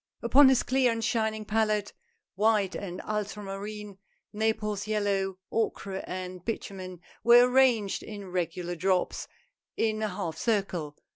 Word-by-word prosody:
Upon 265 +4 +7
his 260 -2 +3
clear 260 -1 +2
and 225 0 -3
shining 220 -2 0
palette, 215 -1 0 0.4
white 205 -1 +2
and 185 -2 -5
ultramarine, 210 -1 -5 0.3
Naples 210 -1 -1
yellow, 200 -3 0
ochre, 200 -3 -2
and 185 -1 -6
bitumen 185 -5 -5 0.2
were 240 +1 +8
arranged 250 -6 +3
in 200 -3 -8
regular 175 0 -2
drops, 185 +1 0 0.5
in 215 -1 0
a 215 - +1
half 180 -5 -4
circle. 185 -9 -1
210 Hz, 125 wpm, -28 LUFS, 190-220 Hz, 0.5 s, were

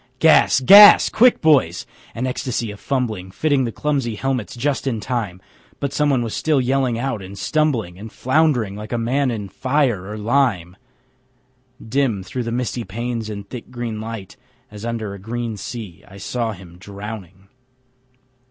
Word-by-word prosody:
Gas! - - +5
GAS! 200 +9 +9
Quick, 245 +2 +4
boys! 135 - +3 0.3
An 120 - -2
ecstasy 125 -3 -3
of 105 - -11
fumbling 110 -9 -2
Fitting 140 +5 +1
the 115 - -3
clumsy 135 -4 -2
helmets 130 -2 -3
just 135 +3 -1
in 115 -4 -1
time, 105 -6 -3 0.4
But 140 -1 -3
someone 140 -6 +1
still 155 +5 0
was 130 - +1
yelling 130 -2 +1
out 120 -3 -3
and 95 +1 -10
stumbling 120 - -1
And 110 +1 -9
flound'ring 130 -7 +1
like 105 +1 -8
a 120 - 0
man 130 +4 0
in 110 -4 -4
fire 125 -3 0
or 105 - -6
lime. 105 -6 0 1.1
Dim 115 -5 0
through 125 +7 -5
the 115 - -3
misty 120 0 -2
panes 115 +2 -4
and 100 -1 -7
thick 120 +2 -9
green 120 -3 -5
light, 110 -3 -7 0.3
As 105 +1 -9
under 115 -3 -4
a 100 - -9
green 115 +2 -4
sea, 105 -4 -8
I 100 - -13
saw 115 +2 -3
him 90 -3 -14
drowning. 100 -1 -9
115 Hz, 160 wpm, -20 LUFS, 100-130 Hz, 1.1 s, GAS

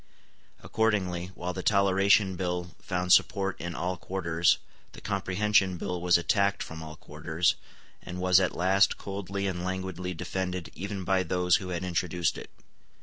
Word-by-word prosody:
Accordingly, 95 -6 0
while 90 +1 -4
the 90 - -4
Toleration 100 0 +3
Bill 90 -1 -3
found 90 -1 +1
support 95 -1 +2
in 85 0 -5
all 90 +1 -2
quarters, 85 -3 +1 0.4
the - - -10
Comprehension 100 -1 +1
Bill 90 0 -4
was 90 0 +5
attacked 100 +3 +1
from 80 0 -8
all 80 -1 -8
quarters, 80 +3 -1 0.5
and 90 0 -7
was 90 0 +5
at 95 -2 0
last 95 +2 +3
coldly 100 0 -4
and 90 -2 -2
languidly 90 -1 -4
defended 90 -1 -4
even 100 0 -5
by 95 +1 +2
those 90 -1 +2
who 95 -3 -7
had 90 0 -3
introduced 90 -1 -1
it. - - -10
90 Hz, 150 wpm, -28 LUFS, 90-95 Hz, 0.5 s, was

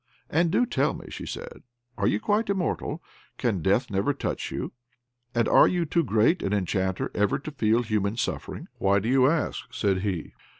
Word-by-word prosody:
"And 170 +2 +3
do 225 +8 +3
tell - - 0
me," - - -10
she - - -7
said, 485 +1 -7 0.3
"are 100 - 0
you 105 - +2
quite 210 - 0
immortal? 175 -4 -1 0.3
Can 110 -8 0
death 100 - +1
never 100 +8 +1
touch - - -3
you? - - -4 0.6
And 120 -1 +2
are - - +7
you 175 -2 0
too 170 +2 +1
great 115 - +3
an 100 - -1
enchanter 95 -1 -1
ever 105 -1 +1
to 155 +3 -7
feel 115 -4 +2
human 110 -1 -1
suffering?" 120 - -3
"Why 100 +1 +3
do 100 +3 -1
you 130 +1 +5
ask?" 150 -5 -2
said 100 -6 +1
he. 95 -5 -3
115 Hz, 185 wpm, -26 LUFS, 100-160 Hz, 0.6 s, are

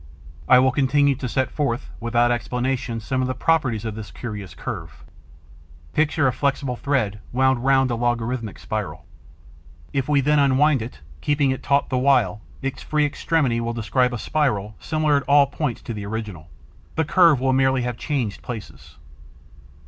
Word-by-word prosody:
I - - +8
will 130 +1 +4
continue 140 +1 +3
to 130 -1 -5
set 130 +2 0
forth, 135 -4 -2
without 120 +1 +2
explanations, 120 -1 -2
some 130 +1 0
of 130 - 0
the 130 - -2
properties 130 -7 +1
of 110 - -3
this 110 0 -8
curious 105 -6 -7
curve. - - -7 0.9
Picture 155 -1 +2
a 130 - +3
flexible 140 -1 -1
thread 120 -7 -1
wound 130 -1 +2
round 135 -1 +3
a - - 0
logarithmic 120 -1 -2
spiral. - - -5 0.9
If 135 0 -1
we 145 -1 +4
then 150 +2 +3
unwind 140 0 +3
it, 110 - -8 0.2
keeping 145 -2 +2
it 130 - -3
taut 140 0 +1
the 130 - 0
while, 110 -7 +2 0.2
its 135 -1 -3
free 150 -1 +1
extremity 145 -5 0
will 115 0 -2
describe 125 +3 +1
a 120 - -3
spiral 110 -6 -1
similar 155 -2 +1
at 140 - -1
all 145 0 +7
points 140 -3 -4
to 115 - -5
the 105 -2 -6
original. 105 -7 -6 0.5
The 160 - +1
curve 165 -3 +5
will 130 0 +1
merely 130 -1 +2
have 125 -1 -2
changed 130 -9 -2
places. 115 -4 -9
130 Hz, 170 wpm, -23 LUFS, 115-140 Hz, 0.9 s, I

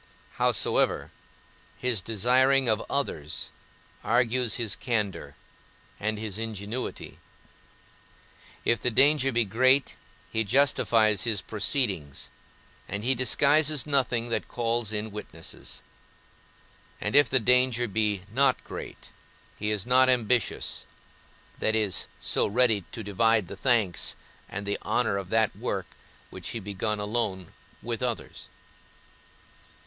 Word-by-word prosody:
Howsoever, - - +1 0.7
his 120 -6 0
desiring 125 +5 +3
of 110 -1 +1
others 80 - -3 0.5
argues 120 0 +2
his 115 -4 -1
candour, 105 -8 -2 0.6
and 110 +1 -1
his 105 -1 -4
ingenuity; 110 +2 -5 1.5
if 115 -2 +2
the - - +1
danger 135 +3 +4
be 120 -1 +2
great, 130 +6 +3 0.4
he 110 - +1
justifies 110 -4 +3
his 110 -3 0
proceedings, 100 - -2 0.6
and 100 +1 -3
he 130 +3 +3
disguises 145 +4 +3
nothing 125 -5 +1
that 115 - -2
calls 115 -2 -1
in 105 0 -2
witnesses; 90 -5 -7 1.2
and 105 - -2
if 145 0 +6
the 130 - +3
danger 125 0 +3
be 105 -2 0
not 140 +3 +2
great, - - -9 0.5
he 105 - -1
is 105 -3 -1
not 130 +1 +5
ambitious, 125 -1 0 0.8
that 110 - +1
is 105 -4 +1
so - - +1
ready 110 -3 +2
to 115 - -6
divide 105 0 +2
the 100 - -8
thanks 110 -5 +1 0.3
and 100 +1 -5
the 100 0 -2
honour 115 -5 0
of 95 -2 -8
that 110 0 +2
work - - -3 0.5
which - - -6
he - - -4
begun 105 +1 -3
alone, 105 -4 -2 0.3
with 115 +1 -4
others. 125 -3 -4
115 Hz, 120 wpm, -27 LUFS, 105-125 Hz, 1.5 s, if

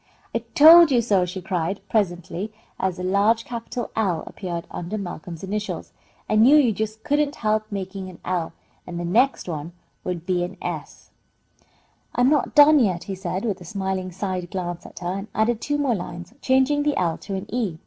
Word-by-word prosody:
"I 230 - +1 0.2
told 330 +2 +10
you 255 -3 +4
so!" 205 -6 +2
she 180 +1 -6
cried, 180 +2 -2
presently, 185 -1 -1 0.3
as 190 -2 -1
a 180 - -5
large 205 +5 +2
capital 235 0 -5
L 185 -8 0
appeared 175 -4 -5
under 180 +5 -4
Malcolm's 175 -3 -7
initials. 210 +2 -4 0.3
"I 215 - +1
knew 245 +7 +7
you 275 -6 +5
just 220 +1 -4
couldn't 290 0 +1
help 215 -1 0
making 190 -1 -5
an 180 - -12
L, 175 -3 -1 0.4
and 175 -1 -5
the 175 - -3
next 240 +9 +2
one 160 0 -5 0.3
will 180 - -2
be 175 +1 -1
an 175 - -6
S." - - -6 1.0
"I'm 250 +3 +4
not 300 +1 +1
done 295 0 +8
yet," 185 -8 +1
he 195 - -5
said, 190 +2 -3
with 200 -5 -2
a - - -8
smiling 190 0 -3
side 185 -1 -3
glance 175 -2 -4
at - - -17
her, 175 0 -3
and 195 +2 -5
added 220 +1 +1
two 290 0 -1
more 280 -4 +1
lines, 175 -1 -6
changing 265 +3 +3
the 290 -1 0
L 170 -3 0
to 200 - -5
an 190 - -4
E. 215 -10 -1
195 Hz, 190 wpm, -23 LUFS, 180-235 Hz, 1.0 s, told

